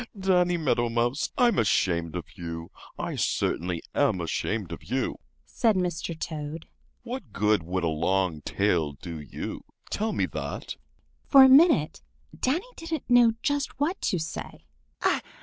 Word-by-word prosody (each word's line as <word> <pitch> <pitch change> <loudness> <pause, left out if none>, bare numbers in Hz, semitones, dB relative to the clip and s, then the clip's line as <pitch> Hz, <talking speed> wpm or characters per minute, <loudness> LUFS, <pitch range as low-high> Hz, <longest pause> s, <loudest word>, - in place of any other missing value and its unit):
Danny 180 -2 +3
Meadow 125 -7 +1
Mouse, 120 +5 0
I'm 240 -2 +4
ashamed 85 -6 +1
of 90 - -4
you! 85 -1 -6 0.3
I - - -3
certainly 85 -1 -1
am 95 - +2
ashamed 90 +3 -2
of 85 - -7
you!" 130 +3 -2 0.3
said 225 -3 +1
Mr. 170 -3 -2
Toad. 155 0 -5 0.4
"What - - -6
good 105 -1 +2
would 90 +3 -3
a - - +2
long 85 +1 0
tail 85 -4 0
do 80 +3 -8
you? 75 - -6 0.3
Tell 220 +2 -1
me - - 0
that." - - -5 0.5
For 275 -2 +9
a - - +9
minute 265 - +5 0.3
Danny 305 - 0
didn't 325 -6 -5
know 240 -2 +6
just 285 -3 -1
what 330 +7 0
to 180 - 0
say. 160 0 -6
130 Hz, 145 wpm, -27 LUFS, -, 0.5 s, For